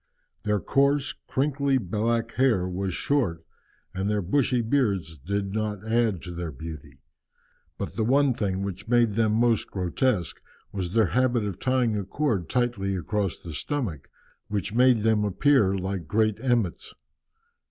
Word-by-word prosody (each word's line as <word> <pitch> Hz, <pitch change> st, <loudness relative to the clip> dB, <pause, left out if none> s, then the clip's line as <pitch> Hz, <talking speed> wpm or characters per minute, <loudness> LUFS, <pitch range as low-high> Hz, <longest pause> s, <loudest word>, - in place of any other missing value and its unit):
Their 105 Hz, -1 st, 0 dB
coarse, 140 Hz, -, +2 dB
crinkly 140 Hz, 0 st, +1 dB
black 115 Hz, +2 st, -1 dB
hair 120 Hz, -9 st, +2 dB
was 95 Hz, 0 st, -3 dB
short, 90 Hz, -, 0 dB, 0.5 s
and 95 Hz, +2 st, -2 dB
their 105 Hz, -2 st, 0 dB
bushy 125 Hz, +5 st, +1 dB
beards 100 Hz, -, 0 dB
did 100 Hz, +6 st, -3 dB
not 105 Hz, -1 st, -3 dB
add 110 Hz, -5 st, +1 dB
to 90 Hz, -, -7 dB
their 85 Hz, -1 st, -4 dB
beauty. 80 Hz, +1 st, -10 dB, 0.7 s
But -, -, -5 dB
the 115 Hz, -, 0 dB
one 135 Hz, +3 st, +3 dB
thing 100 Hz, -4 st, -2 dB
which 100 Hz, +2 st, -5 dB
made 120 Hz, -1 st, +3 dB
them 110 Hz, 0 st, +1 dB
most 115 Hz, 0 st, +2 dB
grotesque 95 Hz, -, -1 dB, 0.3 s
was 95 Hz, -3 st, -4 dB
their 110 Hz, -6 st, +4 dB
habit 125 Hz, -3 st, +2 dB
of 95 Hz, -3 st, -4 dB
tying 130 Hz, -4 st, +1 dB
a -, -, -3 dB
cord 105 Hz, -, -1 dB
tightly 120 Hz, -6 st, 0 dB
across 100 Hz, +1 st, -2 dB
the 85 Hz, -, -9 dB
stomach, 110 Hz, -, -3 dB, 0.4 s
which 105 Hz, 0 st, -3 dB
made 125 Hz, -1 st, +4 dB
them 110 Hz, -1 st, +3 dB
appear 105 Hz, 0 st, +3 dB
like 95 Hz, -3 st, -3 dB
great 110 Hz, +3 st, +1 dB
emmets. 120 Hz, -9 st, -1 dB
105 Hz, 150 wpm, -26 LUFS, 95-125 Hz, 0.7 s, their